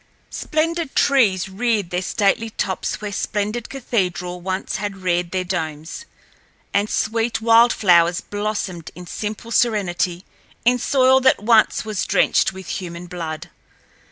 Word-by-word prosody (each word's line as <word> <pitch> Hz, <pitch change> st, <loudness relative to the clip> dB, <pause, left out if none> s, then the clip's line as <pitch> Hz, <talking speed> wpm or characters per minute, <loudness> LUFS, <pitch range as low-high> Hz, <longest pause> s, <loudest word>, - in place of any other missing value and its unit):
Splendid 325 Hz, -1 st, -2 dB
trees 210 Hz, -10 st, +3 dB
reared 205 Hz, -1 st, -1 dB
their 180 Hz, 0 st, -1 dB
stately 205 Hz, +4 st, +1 dB
tops 190 Hz, -2 st, -3 dB
where 210 Hz, -1 st, -4 dB
splendid 210 Hz, +3 st, -2 dB
cathedrals 180 Hz, -9 st, -2 dB
once 185 Hz, +1 st, -3 dB
had 205 Hz, -1 st, -4 dB
reared 175 Hz, -1 st, 0 dB
their 185 Hz, +1 st, -1 dB
domes, 160 Hz, -, -4 dB, 0.7 s
and 205 Hz, +1 st, +1 dB
sweet 225 Hz, +1 st, 0 dB
wild 230 Hz, +1 st, +5 dB
flowers 175 Hz, -3 st, +4 dB
blossomed 205 Hz, -5 st, -4 dB
in 180 Hz, -, -9 dB
simple 215 Hz, +5 st, -5 dB
serenity 185 Hz, -6 st, 0 dB, 0.4 s
in 250 Hz, +1 st, +4 dB
soil 260 Hz, +1 st, +4 dB
that 260 Hz, -5 st, +3 dB
once 220 Hz, -1 st, +4 dB
was 215 Hz, -3 st, -2 dB
drenched -, -, +3 dB
with 190 Hz, 0 st, -10 dB
human 175 Hz, -1 st, -5 dB
blood. 165 Hz, -3 st, -6 dB
205 Hz, 130 wpm, -21 LUFS, 180-230 Hz, 0.7 s, wild